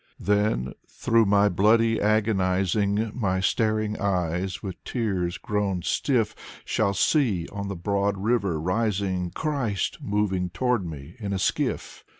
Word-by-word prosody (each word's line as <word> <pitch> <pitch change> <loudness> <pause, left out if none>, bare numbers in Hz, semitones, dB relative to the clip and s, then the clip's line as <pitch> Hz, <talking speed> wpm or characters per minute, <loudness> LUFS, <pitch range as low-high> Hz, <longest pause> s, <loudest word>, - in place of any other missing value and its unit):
Then 105 - +1
through 115 -2 +2
my 100 +1 +4
bloody 110 +4 +3
agonizing 100 0 +1
My 95 -7 0
staring 110 +2 0
eyes, 90 -1 -1
with 95 -3 -7
tears 95 -8 -2
grown 100 -4 -1
stiff, 115 +1 +1 0.3
Shall 100 -2 0
see 100 - +2
on 100 0 -5
the 100 - -4
broad 100 +3 0
river 100 -5 0
rising 95 0 -1
Christ 130 - -2
moving 95 -3 0
toward 125 +3 0
me 75 -1 -8
in 100 -3 -3
a - - 0
skiff. 95 - -2
100 Hz, 130 wpm, -25 LUFS, 95-110 Hz, 0.3 s, my